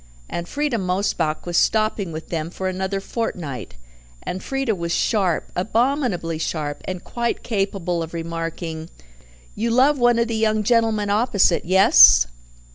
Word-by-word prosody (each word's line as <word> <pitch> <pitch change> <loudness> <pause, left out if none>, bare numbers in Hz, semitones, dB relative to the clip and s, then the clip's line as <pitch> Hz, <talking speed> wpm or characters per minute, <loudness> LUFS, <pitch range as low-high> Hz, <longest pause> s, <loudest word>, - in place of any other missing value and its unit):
And 170 0 -5
Frieda 290 -5 -1
Mosebach 180 -4 -1
was 175 0 -1
stopping 215 -4 +1
with 160 0 -8
them 165 -1 -3
for 190 +2 -4
another 190 +1 -2
fortnight, 180 - -5 0.5
and 185 - -5
Frieda 270 -1 -1
was 170 -3 -4
sharp, 190 -4 0
abominably 220 - 0
sharp, 150 -2 -3
and 185 -1 -5
quite 235 -1 -3
capable 195 -5 -2
of 165 +1 -6
remarking, 165 -1 -5 0.6
"You 230 +3 -2
love 265 +4 +3
one 240 -1 +4
of 235 0 +1
the 230 - -3
young 215 -1 +1
gentlemen 220 -2 +1
opposite, 205 -5 +2
yes?" 65 - +7
190 Hz, 140 wpm, -21 LUFS, 170-225 Hz, 0.6 s, yes